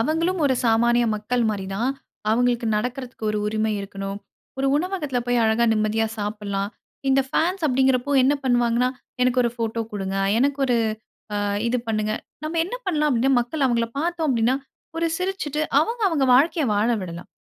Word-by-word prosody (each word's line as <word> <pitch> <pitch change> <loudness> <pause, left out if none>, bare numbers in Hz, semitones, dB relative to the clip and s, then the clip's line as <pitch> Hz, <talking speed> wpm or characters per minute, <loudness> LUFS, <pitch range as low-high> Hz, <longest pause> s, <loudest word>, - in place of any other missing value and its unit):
அவங்களும் 330 +8 0
ஒரு 265 -2 +3
சாமானிய 235 +1 +3
மக்கள் 235 +3 -1
மாரி 195 -2 -4
தான். 235 +6 0 0.4
அவங்களுக்கு 240 0 +2
நடக்கறதுக்கு 250 +1 -4
ஒரு 215 - -1
உரிமை 215 0 0
இருக்கணும். 195 0 -5 0.4
ஒரு 270 - +1
உணவகத்தில 310 -6 -1
போய் 245 -1 +2
அழகா 220 +2 +3
நிம்மதியா 215 +1 +1
சாப்பிடலாம். 205 -1 -3 0.4
இந்த 270 0 +4
ஃபேன்ஸ் 340 +5 0
அப்படிங்கிறப்போ 265 +1 +2
என்ன 275 +3 +4
பண்ணுவாங்கன்னா, 240 -1 +2 0.3
"எனக்கு 250 0 +3
ஒரு 235 - +1
ஃபோட்டோ 230 0 -2
குடுங்க? 195 -1 -3 0.2
எனக்கு 280 +3 +1
ஒரு 245 - +2 0.6
அ - - 0 0.3
இது 250 - +1
பண்ணுங்க." 215 -1 0 0.3
நம்ம 325 +2 -2
என்ன 385 +8 -5
பண்ணலாம் 300 -4 +1
அப்படீன்னா, 255 +2 +2
மக்கள் 270 +4 -2
அவங்கள 235 -2 +1
பார்த்தோம் 335 0 -1
அப்படீன்னா, 245 0 +2 0.4
ஒரு 335 0 +1
சிரிச்சுட்டு 365 -6 -2 0.2
அவங்கவங்க 385 - +1
வாழ்க்கையை 300 +2 +3
வாழ 210 +3 +2
விடலாம். 175 -1 -7
245 Hz, 155 wpm, -23 LUFS, 220-290 Hz, 0.6 s, இந்த